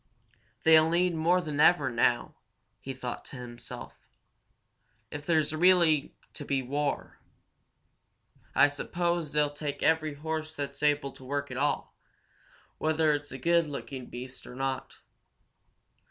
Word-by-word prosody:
"They'll 160 0 +7
need 175 +1 +2
more 170 +3 +2
than 150 -4 -4
ever 150 -5 +5
now," 120 0 +1 0.5
he 135 - -6
thought 125 -2 -6
to - - -10
himself. 120 -1 -9 1.1
"If 145 0 -7
there's 155 -2 +2
really 165 -3 +4 0.2
to - - -8
be 135 -2 -1
war, 145 +3 -2 1.4
I 145 - +7
suppose 170 +2 -2
they'll 150 -1 +1
take 145 -1 -4
every 155 -2 +2
horse 155 +1 -4
that's 140 -1 -5
able 145 -2 +2
to 130 - -15
work 140 +1 -3
at 130 - -5
all, 145 +2 -1 0.8
whether 155 0 +2
it's 145 0 -4
a 135 - -6
good 170 +4 +2
looking 135 -3 -6
beast 125 +1 -8
or 125 - -10
not. 135 0 -3
145 Hz, 135 wpm, -29 LUFS, 135-160 Hz, 1.4 s, They'll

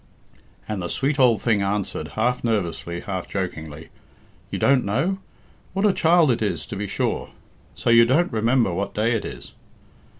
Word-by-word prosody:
And 105 -3 -3
the 85 - -3
sweet 140 +1 -1
old 120 -6 +4
thing 110 -4 +2
answered, 100 -5 -2
half 125 +3 +1
nervously, 85 -6 -2
half 95 -3 -4
jokingly, 80 -5 -5 0.6
"You - - -3
don't 135 -2 +3
know? 155 - 0 0.5
What 195 +2 +1
a 205 - +4
child 165 -4 +4
it 120 - -1
is, 105 - -1
to - - -7
be 100 +1 -3
sure! - - -2 0.5
So - - 0
you 115 0 +7
don't 140 +7 +2
remember 115 -2 +2
what 100 +3 -3
day 110 +3 +1
it 115 -3 -1
is?" - - -8
110 Hz, 170 wpm, -23 LUFS, 100-130 Hz, 0.6 s, you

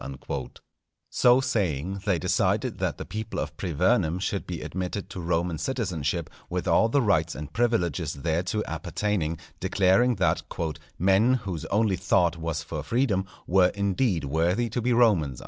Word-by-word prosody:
_" 65 +1 -6 0.5
So 125 +1 +5
saying, 95 - -1
they 100 -4 +2
decided - - 0
that - - -1
the - - -6
people 110 0 -5
of - - -4
Privernum 90 +1 +1
should 100 +1 -2
be 85 -3 -5
admitted 95 +2 -4
to 95 - -6
Roman 85 -1 -1
citizenship, 95 - -2 0.2
with - - -3
all 115 - +4
the 135 +3 +2
rights 85 -6 +2
and 75 0 -7
privileges 90 - 0
thereto 85 +8 -1
appertaining; 90 -2 -2 0.2
declaring 95 +6 +3
that 95 - +1 0.6
"_men 100 +7 +4
whose 90 -7 -5
only 105 0 +1
thought 90 -1 +2
was 80 -1 -3
for 80 -1 -5
freedom, 110 - 0 0.2
were 90 0 +4
indeed 100 -1 0
worthy 85 - +1
to 120 - -1
be 125 +2 +1
Romans. 100 - +3
95 Hz, 150 wpm, -26 LUFS, 85-110 Hz, 0.6 s, So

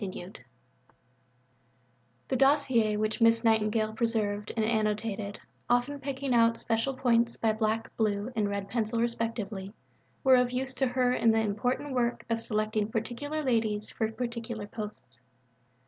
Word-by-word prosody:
III 185 -1 -6 2.0
The 265 - +1
dossiers 260 -6 +3
which 215 +2 -1
Miss 230 0 +5
Nightingale 220 -1 +2
preserved 215 -3 -1
and, 220 - +2
annotated 215 -2 -1 0.3
(often 245 +4 +1
picking 270 -1 -2
out 230 -1 +4
special 230 +4 -1
points 235 -2 +2
by 225 - +2
black, 220 +1 -1
blue, 210 +1 0
and 210 -2 +1
red 200 -1 -3
pencil 230 0 -1
respectively) 225 -4 -2 0.5
were 260 -2 +7
of 250 0 +3
use 260 +1 -1
to 260 +1 +1
her 250 0 +2
in 230 - +3
the 225 0 +4
important 235 +6 -1
work 240 -1 0
of 230 0 0
selecting 215 -1 -1
particular 255 +7 -3
ladies 220 -5 0
for 220 -1 -1
particular 235 -2 -4
posts. 210 - -9
225 Hz, 140 wpm, -29 LUFS, 215-245 Hz, 2.0 s, were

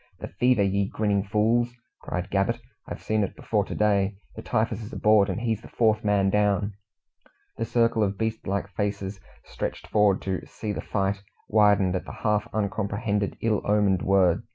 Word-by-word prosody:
"The - - -7
fever, 125 -4 +4
ye 100 0 +1
grinning 105 -2 0
fools!" 115 +4 +1 0.3
cried 90 +3 -4
Gabbett. 100 +4 +1 0.3
"I've - - -7
seen 110 -1 +1
it 100 - -4
before - - 0
to - - -6
day. 100 -1 +2 0.2
The - - -7
typhus 110 0 -1
is 110 - -8
aboard, 105 -2 +4
and 95 +4 -2
he's 115 -2 -1
the - - -12
fourth 110 -2 +1
man 100 -2 +2
down!" 105 0 +1 0.8
The 115 - -1
circle 115 -1 +2
of 100 -1 0
beast 110 0 -3
like 100 +1 -1
faces, 100 -1 -3 0.3
stretched - - -5
forward 105 -2 +2
to 95 -1 -2
"see 110 - -5
the - - -4
fight," 100 -1 -1 0.3
widened 100 -3 +4
at 90 - -3
the - - -8
half 105 -1 +1
uncomprehended, 100 0 -1
ill 110 -2 +1
omened 100 -3 +2
word. 95 -3 +3
105 Hz, 175 wpm, -26 LUFS, 100-110 Hz, 0.8 s, fever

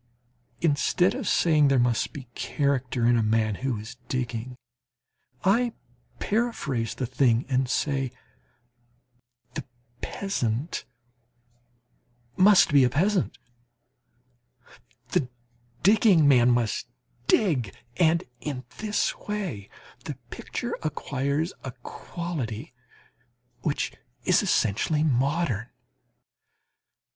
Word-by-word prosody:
Instead 170 +3 +3
of 255 -5 -4
saying, 155 -4 +4
there 135 -1 +3
must 120 -2 +2
be 140 - -8
character 130 -4 0
in 120 0 +5
a 115 - +3
man 110 0 +2
who 130 -3 -1
is 110 +4 -8
digging, 125 -1 -3 0.9
I 230 +5 +3 0.4
paraphrase 200 - -1
the 130 - -2
thing 125 -1 +2
and 130 -1 +1
say, 135 0 0 1.4
the - - -4 0.4
peasant 140 - -2 1.5
must 185 -4 +6
be 140 -2 +7
a 125 - +4
peasant, 180 +8 +1 1.7
the 145 -9 0 0.5
digging 195 -5 +5
man 125 -3 +6
must 120 -3 +1 0.4
dig, 140 - +2 0.3
and 170 0 +3 0.2
in 130 -3 -4 0.2
this 215 -1 0
way 185 - -5 0.4
the - - -4 0.2
picture - - -4
acquires 145 +2 -1
a 130 - -5
quality 135 -11 -5 0.9
which 140 - -1 0.3
is - - +4
essentially 150 +9 +1
modern. 135 -4 +1
140 Hz, 95 wpm, -26 LUFS, 120-170 Hz, 1.7 s, be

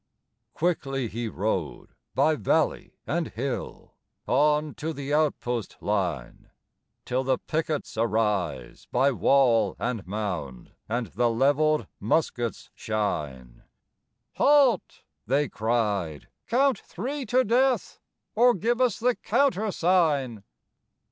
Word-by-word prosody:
Quickly 135 -7 -1
he 115 +2 -4
rode 95 -6 -3 0.3
by 155 - +4
valley 160 +1 0
and 165 +1 -1
hill, 120 -3 -5 0.3
On 150 +3 +2
to 160 +2 -4
the 145 0 -4
outpost 125 -7 -1
line, 90 -11 -3 0.6
Till 130 +2 -1
the 130 0 +1
pickets 155 -1 -3
arise 105 - -1
by 135 +3 +3
wall 120 -6 +3
and 115 -6 -3
mound, 90 - -4 0.2
And 120 +2 -1
the 120 +4 +2
levelled 145 +3 +2
muskets 120 0 -1
shine; 75 - -3 0.8
"Halt!" 280 -4 +3 0.2
they 140 +4 +2
cried, 105 - -1 0.2
"count 260 0 +2
three 270 +9 -5
to 255 +4 +3
death, 250 +3 +1 0.3
Or 245 +2 +5
give 235 +6 0
us 250 -5 +2
the 245 +2 +2
countersign." 175 - +1
135 Hz, 105 wpm, -26 LUFS, 110-165 Hz, 0.8 s, Or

